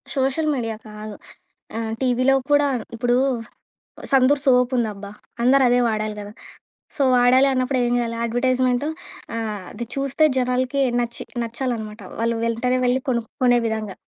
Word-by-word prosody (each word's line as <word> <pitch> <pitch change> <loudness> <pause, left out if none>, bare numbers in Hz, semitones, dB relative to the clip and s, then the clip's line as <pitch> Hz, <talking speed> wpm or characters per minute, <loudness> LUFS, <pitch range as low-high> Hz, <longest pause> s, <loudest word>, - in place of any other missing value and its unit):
Social 270 +4 +1
media 225 -4 -2
కాదు. 210 0 -8 0.6
ఆహ్, 225 -1 -3
టీవీలో 255 +1 +2 0.2
కూడా 290 0 +4 0.3
ఇప్పుడు 245 +1 +1 1.0
'సంతూర్' 270 +1 +4
సోప్ 250 -1 +4
ఉందబ్బా! 210 -4 -3 0.3
అందరదే 250 -1 +4
వాడాలి 215 -1 -2
గదా! 205 0 -8 0.6
సో, 285 - 0
వాడాలి 250 +2 +5
అన్నప్పుడు 255 0 0
ఏం 240 - 0
జేయాలి? 230 -1 -2
అడ్వర్‌టైజ్‌మెంటు 255 +3 +1 0.5
ఆహ్, 215 -3 -3
అది 235 +2 -6
చూస్తే 275 +3 +2
జనాలకి 255 +2 0 0.2
నచ్చి 235 -1 -3 0.2
నచ్చాలనమాట 230 -2 -4 0.2
వాళ్ళు 230 0 0
వెంటనే 250 +2 0
వెళ్లి 250 +2 +2
కొనుక్కునే 245 +1 +1
విధంగా. 220 -3 -3
245 Hz, 130 wpm, -22 LUFS, 225-260 Hz, 1.0 s, వాడాలి